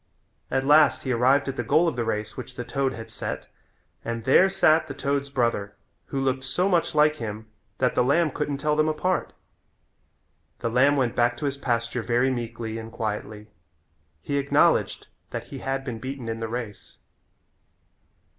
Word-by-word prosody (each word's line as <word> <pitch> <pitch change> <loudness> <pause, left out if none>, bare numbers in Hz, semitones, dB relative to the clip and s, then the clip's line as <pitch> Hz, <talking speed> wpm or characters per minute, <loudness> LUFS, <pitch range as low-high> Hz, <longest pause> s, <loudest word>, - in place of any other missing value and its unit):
At 135 0 0
last 150 +2 +5
he 130 - -2
arrived 130 +4 +3
at 135 - -4
the 120 - -1
goal 160 +9 +3
of 165 - -1
the 120 - -1
race 105 -1 -3
which 125 0 -8
the 120 - -4
toad 135 +1 -1
had 115 0 -9
set - - -5 0.6
and 115 0 -4
there 160 - +5
sat 160 -4 +3
the 140 - -7
toad's 140 0 -1
brother 115 -6 -1 0.3
who 135 - -3
looked 130 0 0
so 175 +8 0
much 175 -5 +1
like 150 0 +4
him 110 -3 -6 0.3
that 125 -1 +1
the - - +3
lamb 155 +5 +2
couldn't 145 0 -2
tell 150 +2 0
them 155 +1 +2
apart. 180 +4 -1 1.3
The 115 -1 -3
lamb 135 +4 +4
went 125 -4 0
back 120 0 +2
to 130 - -4
his 140 -1 -1
pasture 120 -2 -1
very 120 +3 +1
meekly 115 -2 -4
and 110 0 -8
quietly. 105 -2 -5 0.7
He 140 - -1
acknowledged 140 0 +2 0.2
that - - -5
he - - -7
had 135 0 -3
been 120 -4 -5
beaten 130 0 -6
in 115 0 -3
the 115 -1 -4
race. 115 -3 -6
130 Hz, 180 wpm, -25 LUFS, 115-140 Hz, 1.3 s, last